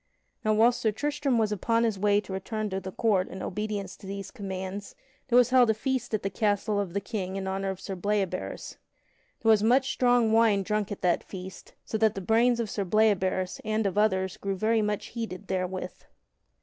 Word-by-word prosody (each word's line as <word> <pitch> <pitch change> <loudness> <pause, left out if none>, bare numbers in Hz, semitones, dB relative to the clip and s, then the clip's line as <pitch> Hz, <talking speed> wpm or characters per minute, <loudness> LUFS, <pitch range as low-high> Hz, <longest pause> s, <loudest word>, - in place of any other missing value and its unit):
Now 215 - +2
whilst 235 +3 +4
Sir 220 - +2
Tristram 290 +2 -1
was 220 -2 +1
upon 230 +3 +1
his 220 -4 0
way 205 0 +3
to 195 - -8
return 210 +2 -3
to 190 - -1
the 190 0 -7
court 195 -3 +1
in 190 - -7
obedience 205 -1 -4
to 195 - -12
these 195 0 -6
commands, 195 -2 -6 0.3
there 245 -2 +4
was 250 0 +5
held 250 -2 +6
a 220 - +3
feast 245 0 -1
at 215 - -4
the 195 - 0
castle 205 +1 0
of 190 -4 -3
the 200 - 0
King 195 -2 -4
in 195 -1 -3
honor 195 0 -2
of 190 -1 -4
Sir 195 0 -5
Bleoberis. 190 - -2 0.7
There 225 - +3
was 215 -2 +5
much 255 +5 +3
strong 245 -3 +3
wine 220 -3 +4
drunk 210 0 -1
at 205 - -6
that 175 -1 +2
feast, 190 0 -10
so 220 - -3
that 220 -1 +3
the - - -3
brains 230 +5 +3
of 230 - -1
Sir 200 0 -2
Bleoberis 190 -2 +1
and 215 0 0
of 195 - 0
others 190 -3 +1
grew 195 0 -3
very 220 +3 +2
much 210 -1 -2
heated 225 -6 -6
therewith. 185 -1 -3
210 Hz, 210 wpm, -28 LUFS, 190-225 Hz, 0.7 s, held